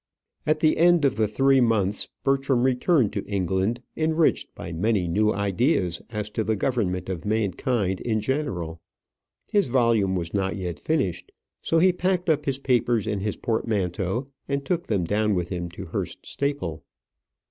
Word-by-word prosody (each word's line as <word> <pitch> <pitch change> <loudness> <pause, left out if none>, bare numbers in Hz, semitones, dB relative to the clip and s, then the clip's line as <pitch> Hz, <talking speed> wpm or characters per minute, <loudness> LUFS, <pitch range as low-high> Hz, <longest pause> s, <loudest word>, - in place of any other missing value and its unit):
At 155 0 +2
the 155 -1 +3
end 170 -2 +5
of 135 - +2
the 110 0 +2
three 135 +5 +3
months 105 -4 +1 0.2
Bertram 135 -2 +2
returned 130 - +2
to - - -2
England, 100 +4 -1
enriched 160 0 +1
by - - -7
many 95 +2 +1
new 105 +5 +2
ideas 100 - 0
as 105 -2 -4
to 110 - -1
the 110 0 0
government 95 -6 -1
of 90 -3 -4
mankind 105 -1 0
in 110 -2 0
general. 95 - -2 0.7
His 205 -6 +3
volume 115 -6 +2
was 85 -2 -3
not 95 -1 0
yet 90 -4 -4
finished. 140 - -1 0.3
So 165 - +1
he 180 +2 +5
packed 180 -1 +1
up 150 -1 0
his 135 -1 0
papers 120 -5 +1
in 105 - -1
his 105 +1 -2
portmanteau 105 0 -1 0.2
and 140 0 -2
took 175 +1 -1
them 100 -5 +1
down 105 +3 +1
with 90 -1 -2
him 85 -2 -3
to 85 +2 -8
Hurst 80 - -5
Staple. 140 - -3
110 Hz, 165 wpm, -25 LUFS, 95-135 Hz, 0.7 s, end